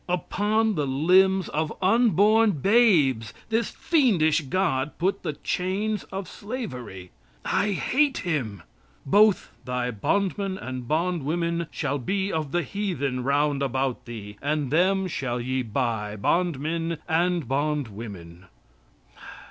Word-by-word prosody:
Upon 210 Hz, +5 st, +1 dB
the 150 Hz, -6 st, -1 dB
limbs 185 Hz, +7 st, +3 dB
of 155 Hz, 0 st, -1 dB
unborn 215 Hz, +1 st, +4 dB
babes 150 Hz, -, +3 dB
this 225 Hz, 0 st, 0 dB
fiendish 195 Hz, -, +2 dB
God 150 Hz, -2 st, -1 dB
put 185 Hz, +3 st, 0 dB
the 150 Hz, -, -3 dB
chains 195 Hz, +6 st, -2 dB
of 190 Hz, -1 st, -6 dB
slavery. 125 Hz, -, -7 dB, 0.3 s
I 205 Hz, 0 st, +1 dB
hate 280 Hz, +8 st, +1 dB
him. 115 Hz, -, -2 dB, 0.4 s
"Both 205 Hz, +7 st, +4 dB
thy 125 Hz, 0 st, -2 dB
bondmen 195 Hz, -, -1 dB
and 130 Hz, -5 st, -6 dB
bondwomen 170 Hz, +1 st, -1 dB
shall 145 Hz, -2 st, -2 dB
be 195 Hz, +9 st, -1 dB
of 155 Hz, -3 st, -2 dB
the 175 Hz, +1 st, 0 dB
heathen 140 Hz, -8 st, -2 dB
round 140 Hz, +1 st, +1 dB
about 130 Hz, -1 st, -1 dB
thee 105 Hz, -3 st, -8 dB
and 145 Hz, -2 st, -1 dB
them 190 Hz, +4 st, +3 dB
shall 130 Hz, -8 st, -3 dB
ye 130 Hz, +2 st, -1 dB
buy, 110 Hz, -3 st, -2 dB
bondmen 165 Hz, -, 0 dB
and 170 Hz, -2 st, +1 dB
bondwomen." 110 Hz, -, -4 dB
160 Hz, 115 wpm, -25 LUFS, 130-195 Hz, 0.4 s, unborn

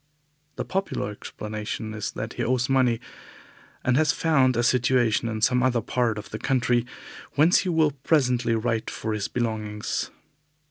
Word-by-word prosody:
The -, -, -4 dB
popular 190 Hz, -, -2 dB
explanation 105 Hz, +1 st, -6 dB
is 110 Hz, -1 st, -3 dB
that -, -, -5 dB
he -, -, -3 dB
owes 125 Hz, 0 st, +1 dB
money, 130 Hz, -4 st, +2 dB, 0.8 s
and 130 Hz, -, +2 dB
has 155 Hz, 0 st, +4 dB
found 135 Hz, -8 st, +2 dB
a 120 Hz, -, +2 dB
situation 120 Hz, -2 st, +2 dB
in 110 Hz, -1 st, -4 dB
some 125 Hz, +2 st, +3 dB
other 125 Hz, -1 st, +2 dB
part 115 Hz, 0 st, 0 dB
of 105 Hz, -, -8 dB
the 110 Hz, -, -5 dB
country, 125 Hz, -2 st, +1 dB, 0.5 s
whence 160 Hz, +5 st, +5 dB
he 185 Hz, -, -1 dB
will 160 Hz, -3 st, +3 dB
presently 125 Hz, -4 st, +1 dB
write 115 Hz, 0 st, -1 dB
for 110 Hz, -, -4 dB
his 105 Hz, -2 st, -2 dB
belongings. 110 Hz, -3 st, -2 dB
120 Hz, 155 wpm, -25 LUFS, 110-130 Hz, 0.8 s, whence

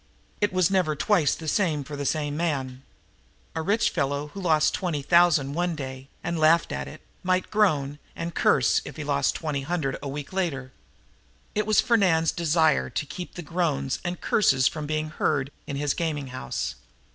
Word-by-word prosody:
It 205 Hz, -, +1 dB
was 185 Hz, 0 st, +2 dB
never 180 Hz, -6 st, +2 dB
twice 175 Hz, -2 st, +2 dB
the 160 Hz, -, -8 dB
same 155 Hz, -5 st, +1 dB
for 145 Hz, +2 st, -7 dB
the 140 Hz, -1 st, -3 dB
same 145 Hz, -1 st, -1 dB
man. 135 Hz, -6 st, -2 dB, 0.7 s
A 160 Hz, -, -2 dB
rich 205 Hz, +7 st, +2 dB
fellow, 145 Hz, -1 st, -1 dB
who 195 Hz, -, -8 dB
lost 155 Hz, -4 st, +3 dB
twenty 165 Hz, -6 st, -2 dB
thousand 170 Hz, -4 st, +4 dB
one 175 Hz, +1 st, 0 dB
day 130 Hz, -2 st, -7 dB, 0.2 s
and 170 Hz, -1 st, -2 dB
laughed 160 Hz, +1 st, +4 dB
at 70 Hz, 0 st, -3 dB
it, 70 Hz, -, -10 dB, 0.2 s
might 185 Hz, 0 st, 0 dB
groan 150 Hz, -9 st, +2 dB, 0.2 s
and 170 Hz, 0 st, -4 dB
curse 130 Hz, -4 st, +3 dB
if -, -, -9 dB
he 155 Hz, -, -5 dB
lost 140 Hz, -1 st, +1 dB
twenty 150 Hz, -4 st, -2 dB
hundred 140 Hz, -3 st, -2 dB
a 140 Hz, -, -4 dB
week 145 Hz, +4 st, -6 dB
later. 140 Hz, -9 st, -2 dB, 0.8 s
It 210 Hz, 0 st, -1 dB
was 215 Hz, -, +5 dB
Fernand's 185 Hz, -9 st, +3 dB
desire 160 Hz, -2 st, +2 dB
to -, -, -3 dB
keep 175 Hz, +4 st, -8 dB
those 175 Hz, -, -7 dB
groans 145 Hz, -5 st, -1 dB
and 175 Hz, 0 st, -3 dB
curses 130 Hz, -11 st, +3 dB
from 150 Hz, -2 st, -3 dB
being 155 Hz, 0 st, -1 dB
heard 145 Hz, -3 st, 0 dB, 0.2 s
in 140 Hz, -, -4 dB
his 145 Hz, 0 st, 0 dB
gaming 150 Hz, -5 st, -2 dB
house. 95 Hz, -, -4 dB
155 Hz, 180 wpm, -26 LUFS, 140-175 Hz, 0.8 s, was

